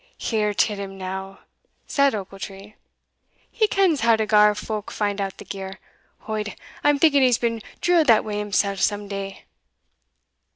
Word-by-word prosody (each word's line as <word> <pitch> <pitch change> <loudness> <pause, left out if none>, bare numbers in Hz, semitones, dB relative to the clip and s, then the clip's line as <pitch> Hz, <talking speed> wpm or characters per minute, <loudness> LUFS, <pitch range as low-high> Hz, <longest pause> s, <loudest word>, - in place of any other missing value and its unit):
"Hear 215 -2 0
till 210 0 +2
him 195 -1 -6
now!" 190 +1 -6 0.4
said 280 -3 +2
Ochiltree, 195 +1 -8 0.8
"he 440 -2 +2
kens 380 -8 +2
how 230 0 +5
to 220 0 0
gar 210 -1 +5
folk 215 0 -5
find 205 -1 -2
out 195 -1 -4
the - - -11
gear 190 -1 -7 0.5
Od, 215 -1 -3 0.3
I'm 290 0 +4
thinking 285 -2 +4
he's 250 -3 +4
been 230 -2 -1 0.2
drilled 345 -4 +3
that 225 -3 +5
way 210 -1 -3
himsell 200 -1 0
some 205 +1 0
day." 195 -1 -6
210 Hz, 155 wpm, -23 LUFS, 195-230 Hz, 0.8 s, how